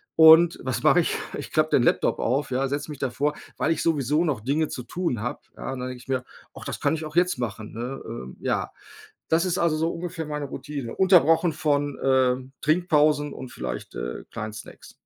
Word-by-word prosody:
und 160 Hz, +1 st, +8 dB
was 130 Hz, -1 st, -2 dB
mache 165 Hz, +3 st, +6 dB
ich? -, -, -1 dB, 0.2 s
Ich -, -, -7 dB
klappe 155 Hz, 0 st, +2 dB
den 125 Hz, -, +4 dB
Laptop -, -, +2 dB
auf, 135 Hz, +4 st, 0 dB
ja, 130 Hz, +2 st, +1 dB
setze 145 Hz, +3 st, -3 dB
mich 145 Hz, -, -8 dB
davor, 140 Hz, +3 st, 0 dB, 0.2 s
weil 160 Hz, -, +1 dB
ich -, -, 0 dB
sowieso 150 Hz, -1 st, +2 dB
noch 145 Hz, -8 st, 0 dB
Dinge 145 Hz, +7 st, 0 dB
zu 125 Hz, -, -5 dB
tun 170 Hz, -, -2 dB
habe, 120 Hz, -, -4 dB, 0.2 s
ja, -, -, -4 dB
und 130 Hz, -, -6 dB
dann 125 Hz, 0 st, -4 dB
denke 125 Hz, -1 st, -8 dB
ich -, -, -18 dB
mir: 130 Hz, -1 st, 0 dB, 0.3 s
„Och, -, -, -9 dB
das -, -, -4 dB
kann -, -, +2 dB
ich 160 Hz, -, -5 dB
auch 155 Hz, +1 st, -9 dB
jetzt 180 Hz, -4 st, +3 dB
machen“, 110 Hz, -2 st, -5 dB
ne, 125 Hz, +4 st, -5 dB
ähm, 65 Hz, -, -8 dB
ja. -, -, -1 dB, 0.6 s
Das 165 Hz, +2 st, +3 dB
ist 180 Hz, -, 0 dB
also 170 Hz, -2 st, +2 dB
so 165 Hz, +2 st, 0 dB
ungefähr 170 Hz, -1 st, -5 dB
meine 150 Hz, -1 st, -4 dB
Routine, 140 Hz, -3 st, -6 dB
unterbrochen 175 Hz, -3 st, +5 dB
von, 145 Hz, -3 st, 0 dB
äh, 130 Hz, -2 st, +3 dB, 0.3 s
Trinkpausen 150 Hz, -3 st, +2 dB
und 130 Hz, -, -8 dB
vielleicht, -, -, -6 dB
äh, -, -, -5 dB
kleinen 110 Hz, 0 st, -5 dB
Snacks. 110 Hz, -, -11 dB
145 Hz, 210 wpm, -25 LUFS, 125-160 Hz, 0.6 s, und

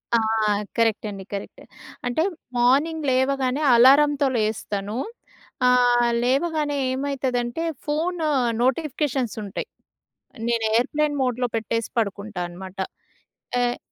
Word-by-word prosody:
ఆ! -, -, +6 dB, 0.6 s
కరెక్ట్ 225 Hz, -2 st, +2 dB
అండి, 195 Hz, -1 st, -7 dB
కరెక్ట్. 200 Hz, -, -7 dB, 0.4 s
అంటే 280 Hz, +7 st, +1 dB, 0.3 s
మార్నింగ్ 290 Hz, +6 st, +2 dB
లేవగానే 265 Hz, +1 st, +1 dB
అలారంతో 280 Hz, +3 st, +6 dB
లేస్తాను. 215 Hz, -1 st, -2 dB, 0.7 s
ఆహ్, 245 Hz, -1 st, +4 dB
లేవగానే 290 Hz, +2 st, +1 dB, 0.2 s
ఏమైతదంటే 260 Hz, 0 st, -2 dB, 0.2 s
ఫోను 320 Hz, +2 st, -1 dB, 0.4 s
నోటిఫికేషన్స్ 265 Hz, -2 st, 0 dB
ఉంటయి. 200 Hz, -1 st, -5 dB, 0.8 s
నేను 230 Hz, -2 st, +1 dB
ఏర్‌ప్లేన్ 290 Hz, +4 st, 0 dB
మోడ్‌లో 250 Hz, -1 st, 0 dB
పెట్టేసి 225 Hz, 0 st, -2 dB
పడుకుంటా 200 Hz, -2 st, -2 dB
అనమాట. 185 Hz, +2 st, -10 dB, 0.8 s
ఎహ్ 245 Hz, 0 st, 0 dB
250 Hz, 95 wpm, -23 LUFS, 225-290 Hz, 0.8 s, ఆ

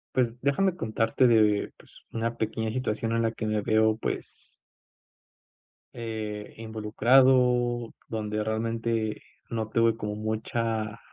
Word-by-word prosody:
Pues 120 Hz, -2 st, +1 dB
déjame 175 Hz, +7 st, +1 dB
contarte 115 Hz, +3 st, +2 dB
de 110 Hz, -3 st, +3 dB
pues -, -, -18 dB
una 115 Hz, +1 st, -2 dB
pequeña 110 Hz, 0 st, -2 dB
situación 115 Hz, -2 st, -2 dB
en 115 Hz, 0 st, +1 dB
la 115 Hz, 0 st, 0 dB
que 110 Hz, -, -4 dB
me 110 Hz, 0 st, 0 dB
veo 110 Hz, +1 st, +3 dB
pues -, -, -6 dB, 1.4 s
eh, 110 Hz, -2 st, -5 dB
involucrado, 120 Hz, +2 st, +3 dB, 0.2 s
donde 105 Hz, -1 st, -2 dB
realmente 115 Hz, 0 st, -1 dB, 0.3 s
no 110 Hz, -2 st, -3 dB
tuve 115 Hz, -1 st, +3 dB
como 105 Hz, -2 st, -4 dB
mucha 110 Hz, 0 st, -2 dB
115 Hz, 120 wpm, -27 LUFS, 110-115 Hz, 1.4 s, de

